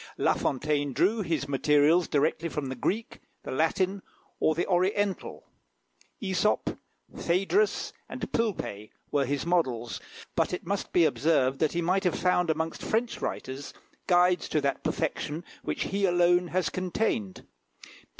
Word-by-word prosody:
La -, -, +3 dB
Fontaine 145 Hz, 0 st, -1 dB
drew 215 Hz, -, +2 dB
his 160 Hz, -6 st, -1 dB
materials 150 Hz, +4 st, +3 dB
directly 155 Hz, +3 st, +1 dB
from 145 Hz, -4 st, -3 dB
the 130 Hz, -, -4 dB
Greek, 215 Hz, -, -2 dB, 0.2 s
the -, -, -6 dB
Latin, 185 Hz, +7 st, +1 dB, 0.4 s
or 155 Hz, -, +2 dB
the 170 Hz, -, 0 dB
Oriental, 190 Hz, +2 st, 0 dB, 0.8 s
Æsop, 190 Hz, 0 st, 0 dB, 0.4 s
Phædrus, 195 Hz, -, +1 dB, 0.2 s
and -, -, -5 dB
Pilpay 180 Hz, -, -2 dB, 0.2 s
were 140 Hz, -2 st, +2 dB
his 140 Hz, +2 st, -1 dB
models; 125 Hz, -11 st, 0 dB, 0.3 s
but -, -, +1 dB
it 180 Hz, -, -4 dB
must 200 Hz, +3 st, -2 dB
be 175 Hz, -2 st, +5 dB
observed 140 Hz, -4 st, +2 dB
that 155 Hz, -, +1 dB
he 175 Hz, 0 st, 0 dB
might 185 Hz, +3 st, +1 dB
have 180 Hz, -4 st, +1 dB
found 180 Hz, -1 st, +2 dB
amongst 160 Hz, +1 st, -1 dB
French 230 Hz, +2 st, -1 dB
writers 135 Hz, +2 st, -5 dB, 0.3 s
guides 180 Hz, 0 st, +3 dB
to 155 Hz, -, +2 dB
that 140 Hz, -1 st, -1 dB
perfection 155 Hz, +3 st, -2 dB, 0.2 s
which -, -, -2 dB
he 200 Hz, +1 st, 0 dB
alone 175 Hz, 0 st, +3 dB
has 180 Hz, -1 st, 0 dB
attained. 180 Hz, -, -2 dB
170 Hz, 140 wpm, -28 LUFS, 145-185 Hz, 0.8 s, be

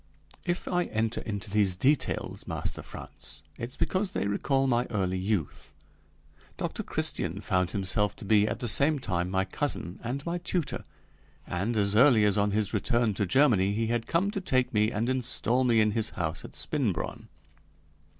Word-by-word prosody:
If 175 Hz, +1 st, -1 dB
I 180 Hz, -1 st, +1 dB
enter 110 Hz, +1 st, -1 dB
into 100 Hz, -1 st, -5 dB
these 100 Hz, -3 st, +3 dB
details, 135 Hz, +8 st, 0 dB
Master -, -, -3 dB
Frantz, -, -, -9 dB, 0.2 s
it's 120 Hz, +2 st, -6 dB
because 185 Hz, +3 st, 0 dB
they -, -, -1 dB
recall 135 Hz, +7 st, +1 dB
my 120 Hz, -2 st, +2 dB
early 95 Hz, -4 st, -1 dB
youth; 95 Hz, -5 st, -3 dB, 0.8 s
Dr. -, -, -3 dB
Christian -, -, -2 dB
found 90 Hz, -1 st, 0 dB
himself 100 Hz, +2 st, 0 dB
to -, -, -10 dB
be 105 Hz, 0 st, +4 dB
at 120 Hz, -, -3 dB
the 120 Hz, -, -1 dB
same 145 Hz, +7 st, +3 dB
time 90 Hz, -8 st, -1 dB
my 95 Hz, 0 st, +1 dB
cousin 95 Hz, -4 st, -2 dB
and 130 Hz, +4 st, -3 dB
my 170 Hz, +1 st, -2 dB
tutor, 175 Hz, -2 st, -2 dB, 0.6 s
and 100 Hz, +7 st, -2 dB
as 100 Hz, -1 st, +2 dB
early 115 Hz, -3 st, +6 dB
as 105 Hz, -, +3 dB
on 105 Hz, 0 st, +2 dB
his 105 Hz, 0 st, 0 dB
return 115 Hz, +1 st, +1 dB
to 100 Hz, 0 st, -1 dB
Germany 100 Hz, -4 st, +4 dB
he 115 Hz, +1 st, -1 dB
had 115 Hz, -1 st, -1 dB
come 190 Hz, +5 st, +1 dB
to 195 Hz, -, -3 dB
take 130 Hz, -9 st, +1 dB
me 105 Hz, 0 st, +3 dB
and 110 Hz, +2 st, -1 dB
install 125 Hz, -1 st, +1 dB
me 120 Hz, -3 st, +4 dB
in 105 Hz, -1 st, +4 dB
his 110 Hz, 0 st, 0 dB
house 80 Hz, -3 st, -3 dB
at -, -, -10 dB
Spinbronn. -, -, -2 dB
110 Hz, 175 wpm, -28 LUFS, 100-130 Hz, 0.8 s, early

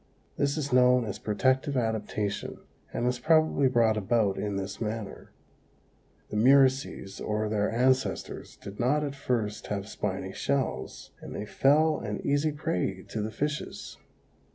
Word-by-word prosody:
This 140 Hz, +2 st, 0 dB
is 140 Hz, -3 st, -2 dB
known 125 Hz, -1 st, +5 dB
as 100 Hz, -2 st, -5 dB
protective 130 Hz, +6 st, +1 dB
adaptation 105 Hz, -3 st, -2 dB, 0.3 s
and 120 Hz, -, -2 dB
was 125 Hz, 0 st, 0 dB
probably 155 Hz, -2 st, +3 dB
brought 115 Hz, -3 st, +3 dB
about 105 Hz, -1 st, +1 dB
in 105 Hz, -1 st, -3 dB
this 100 Hz, +2 st, -5 dB
manner: 110 Hz, -2 st, -5 dB, 1.0 s
the -, -, -4 dB
murices, 130 Hz, -4 st, +3 dB
or 105 Hz, 0 st, -1 dB
their 105 Hz, -1 st, 0 dB
ancestors, 130 Hz, +3 st, 0 dB
did 100 Hz, 0 st, -10 dB
not 145 Hz, +5 st, +2 dB
at 140 Hz, -2 st, -3 dB
first 115 Hz, -6 st, -2 dB
have 100 Hz, -1 st, -3 dB
spiny 95 Hz, -3 st, -4 dB
shells, 140 Hz, +2 st, -2 dB
and -, -, -8 dB
they 105 Hz, -, -4 dB
fell 150 Hz, +8 st, +3 dB
an 105 Hz, -2 st, -4 dB
easy 145 Hz, +2 st, +2 dB
prey 145 Hz, -, -2 dB
to 110 Hz, -, -3 dB
the 105 Hz, -, -2 dB
fishes. 150 Hz, +6 st, -4 dB
120 Hz, 145 wpm, -28 LUFS, 105-140 Hz, 1.0 s, known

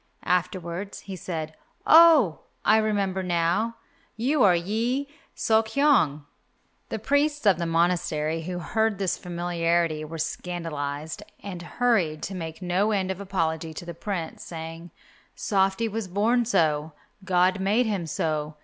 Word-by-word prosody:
Afterwards 180 Hz, +1 st, -2 dB
he 195 Hz, -, -7 dB
said, 160 Hz, -3 st, -5 dB, 0.3 s
"Oh, 315 Hz, -, +7 dB, 0.3 s
I 215 Hz, -, +6 dB
remember 200 Hz, -3 st, 0 dB
now, 180 Hz, +6 st, 0 dB, 0.4 s
you 265 Hz, +5 st, +1 dB
are 185 Hz, -4 st, +6 dB
Yi 230 Hz, +10 st, -1 dB, 0.3 s
Sok 220 Hz, 0 st, +2 dB
hyong." 220 Hz, -, +2 dB, 0.6 s
The 225 Hz, -, -2 dB
priests 285 Hz, +5 st, +1 dB
of 190 Hz, -4 st, +5 dB
the 170 Hz, -, -1 dB
monastery 165 Hz, -2 st, +1 dB
who 180 Hz, +2 st, -4 dB
heard 220 Hz, +5 st, 0 dB
this 190 Hz, -2 st, 0 dB
familiarity 170 Hz, -2 st, -1 dB
were 160 Hz, +2 st, -7 dB
scandalized, 160 Hz, -3 st, -4 dB, 0.2 s
and 185 Hz, -4 st, -6 dB
hurried 175 Hz, -5 st, 0 dB
to 195 Hz, -, -4 dB
make 165 Hz, -1 st, -6 dB
no 180 Hz, +4 st, +1 dB
end 190 Hz, -3 st, 0 dB
of 190 Hz, +1 st, -5 dB
apology 165 Hz, -4 st, -2 dB
to 175 Hz, -, -7 dB
the 170 Hz, -, -6 dB
Prince, 170 Hz, -2 st, -5 dB
saying, 165 Hz, +1 st, -8 dB, 0.5 s
"Softy 195 Hz, +2 st, +1 dB
was 220 Hz, -1 st, -4 dB
born 225 Hz, +6 st, +2 dB
so, 160 Hz, -7 st, +1 dB, 0.3 s
God 185 Hz, 0 st, +2 dB
made 210 Hz, +6 st, +2 dB
him 200 Hz, -6 st, -2 dB
so. 155 Hz, -1 st, -2 dB
180 Hz, 140 wpm, -26 LUFS, 165-215 Hz, 0.6 s, Oh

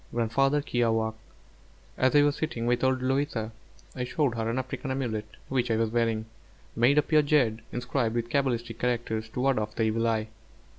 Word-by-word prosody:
GRANDFATHER 135 Hz, +5 st, +2 dB
KIAWĀKQ' 115 Hz, -4 st, +1 dB, 0.8 s
As 130 Hz, +2 st, +2 dB
I 145 Hz, -, +7 dB
was 145 Hz, 0 st, +2 dB
sitting 135 Hz, -8 st, -3 dB
with 120 Hz, +1 st, +1 dB
old 130 Hz, -1 st, +2 dB
Louisa 130 Hz, -4 st, -1 dB, 0.4 s
I 125 Hz, -, -2 dB
showed 130 Hz, +1 st, 0 dB
her 115 Hz, -1 st, -2 dB
an 115 Hz, -, -1 dB
African 130 Hz, +2 st, -4 dB
amulet 120 Hz, -5 st, -2 dB, 0.2 s
which 125 Hz, -2 st, 0 dB
I 115 Hz, -, +2 dB
was 110 Hz, 0 st, 0 dB
wearing, 115 Hz, -2 st, 0 dB, 0.5 s
made 125 Hz, +5 st, +4 dB
of 150 Hz, -, +3 dB
pure 155 Hz, -1 st, +5 dB
jade, 130 Hz, -7 st, +2 dB
inscribed 120 Hz, -1 st, -1 dB
with 120 Hz, 0 st, -2 dB
cabalistic 120 Hz, -4 st, -1 dB
characters 115 Hz, -2 st, -1 dB
to 125 Hz, -, -4 dB
ward 135 Hz, -2 st, +2 dB
off 105 Hz, 0 st, -4 dB
the 115 Hz, -, +1 dB
evil 115 Hz, +1 st, +1 dB
eye. 110 Hz, -1 st, 0 dB
120 Hz, 185 wpm, -28 LUFS, 115-135 Hz, 0.8 s, I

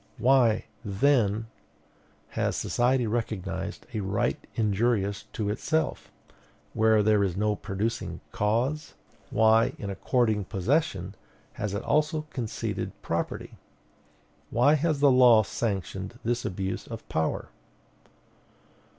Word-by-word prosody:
Why, 125 Hz, -3 st, +4 dB, 0.2 s
then, 110 Hz, 0 st, +2 dB, 0.8 s
has -, -, -1 dB
society 125 Hz, +1 st, +1 dB
recognized 100 Hz, -4 st, -3 dB
a 110 Hz, -, -1 dB
right 100 Hz, 0 st, 0 dB, 0.2 s
injurious 105 Hz, -2 st, +1 dB
to 105 Hz, -4 st, -2 dB
itself, 160 Hz, +8 st, -1 dB, 0.6 s
where 110 Hz, -1 st, +4 dB
there 105 Hz, -1 st, +4 dB
is 95 Hz, -2 st, -1 dB
no 105 Hz, +1 st, +1 dB
producing 105 Hz, +3 st, -3 dB
cause? 120 Hz, +9 st, -1 dB, 0.3 s
Why, 110 Hz, +1 st, +4 dB
in 100 Hz, -2 st, -5 dB
according 110 Hz, -1 st, +1 dB
possession, 95 Hz, -, 0 dB, 0.4 s
has 100 Hz, -1 st, -3 dB
it 100 Hz, -, -3 dB
also 150 Hz, +1 st, +1 dB
conceded 115 Hz, -4 st, -4 dB
property? -, -, -3 dB, 0.9 s
Why 130 Hz, +5 st, +4 dB
has 155 Hz, -1 st, +1 dB
the 140 Hz, -2 st, +6 dB
law 125 Hz, -4 st, +7 dB
sanctioned 100 Hz, 0 st, -3 dB
this 120 Hz, +1 st, -1 dB
abuse 95 Hz, +1 st, -3 dB
of -, -, -8 dB
power? 80 Hz, 0 st, -1 dB
110 Hz, 105 wpm, -27 LUFS, 100-125 Hz, 0.9 s, law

